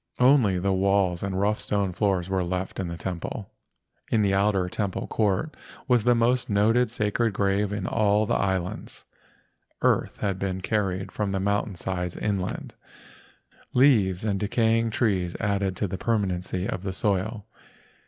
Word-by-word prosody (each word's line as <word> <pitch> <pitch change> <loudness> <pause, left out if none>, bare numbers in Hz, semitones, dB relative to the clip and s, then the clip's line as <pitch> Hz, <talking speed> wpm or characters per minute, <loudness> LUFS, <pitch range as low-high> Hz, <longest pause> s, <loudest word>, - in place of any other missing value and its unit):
Only 125 -7 +4
the 95 +2 0
walls 95 -2 +2
and 95 -1 -2
rough 105 +2 +1
stone 100 -3 -1
floors 95 -2 0
were 95 -1 0
left 90 +2 -3
in 95 - -2
the 85 0 -5
temple. 90 +3 -5 0.6
In 110 -2 +2
the 100 -1 +2
outer 100 -2 +2
temple 100 +1 -3
court 105 +7 0 0.3
was 125 -4 +3
the 120 0 +5
most 120 +2 +1
noted 110 +4 +3
sacred 110 0 0
grave 100 +1 +1
in 100 -2 -3
all 105 -1 +2
the - - -1
islands. 95 -2 -2 0.8
Earth - - +2
had 100 -2 -2
been 95 -1 -2
carried 95 -2 -1
from 105 -2 -2
the 95 - 0
mountain 100 0 0
sides 90 0 -3
inland. 100 -3 -3 1.0
Leaves 110 -8 +4
and 100 -3 0
decaying 115 +2 +1
trees 95 -7 0
added 100 -2 0
to 100 - -1
the 95 +1 -5
permanency 95 -4 -1
of 95 - -3
the 95 -1 -4
soil. 100 +2 -1
100 Hz, 155 wpm, -26 LUFS, 95-105 Hz, 1.0 s, the